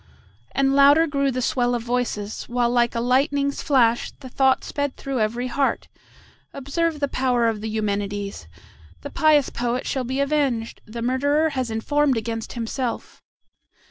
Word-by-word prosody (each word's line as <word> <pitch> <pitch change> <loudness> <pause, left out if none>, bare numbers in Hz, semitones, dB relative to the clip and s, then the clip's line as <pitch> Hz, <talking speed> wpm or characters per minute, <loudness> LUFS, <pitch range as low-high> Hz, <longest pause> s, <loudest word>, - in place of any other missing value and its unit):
And 275 0 +2
louder 285 +3 +6
grew 280 -3 0
the 255 -1 -2
swell 245 -1 +1
of 235 - -3
voices, 235 -4 -2
while 240 0 0
like 240 -1 +2
a - - 0
lightning's 280 +3 +1
flash 240 -5 +2
the 260 - -12
thought 265 +1 +2
sped 285 -2 -3
through 270 -2 -3
every 230 +3 -1
heart, 270 +2 -1 0.6
"Observe 300 +4 -2
the 285 - 0
power 250 -3 +1
of 220 -2 -1
the 220 - -4
Eumenides! 205 - -3 0.5
The - - -7
pious 305 -3 +3
poet 245 +1 -2
shall 265 - -1
be 260 +2 -3
avenged! 280 -5 0
the 230 +2 -6
murderer 285 +5 +2
has 260 -4 -2
informed 270 +4 +1
against 225 0 -4
himself. 235 +1 -4
255 Hz, 155 wpm, -23 LUFS, 230-280 Hz, 0.6 s, louder